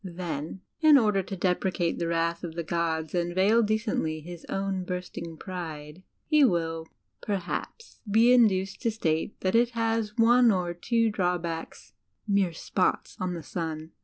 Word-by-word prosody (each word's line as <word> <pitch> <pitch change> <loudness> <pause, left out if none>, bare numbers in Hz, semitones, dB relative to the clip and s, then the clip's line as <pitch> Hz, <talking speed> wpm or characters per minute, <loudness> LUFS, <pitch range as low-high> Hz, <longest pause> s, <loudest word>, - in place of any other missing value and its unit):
Then, 175 -2 -5 0.2
in 310 -3 +7
order 210 -6 +3
to 195 +1 -6
deprecate 180 -1 0
the 170 - -1
wrath 170 +1 -1
of 165 -2 -6
the 170 - -3
gods 160 -1 -2
and 175 -1 -1
veil 205 +5 +4
decendy 210 -8 -1
his 175 0 -9
own 195 -1 -2
bursting 180 -2 -6
pride, 160 -3 -7 0.2
he 305 -2 +4
will, 165 -7 +1 0.3
perhaps, 205 - -4
be 230 +4 +5
induced 195 -6 +3
to 230 - +1
state 165 -5 -2
that 185 - 0
it 235 +1 +4
has 225 -1 -1
one 240 +1 +6
or 180 -4 0
two 230 +5 +1
drawbacks 175 -4 -3 0.3
mere 200 -3 +2
spots 180 +3 -1
on 185 -1 -2
the 165 - -7
sun. 160 -1 -5
180 Hz, 155 wpm, -27 LUFS, 170-215 Hz, 0.3 s, in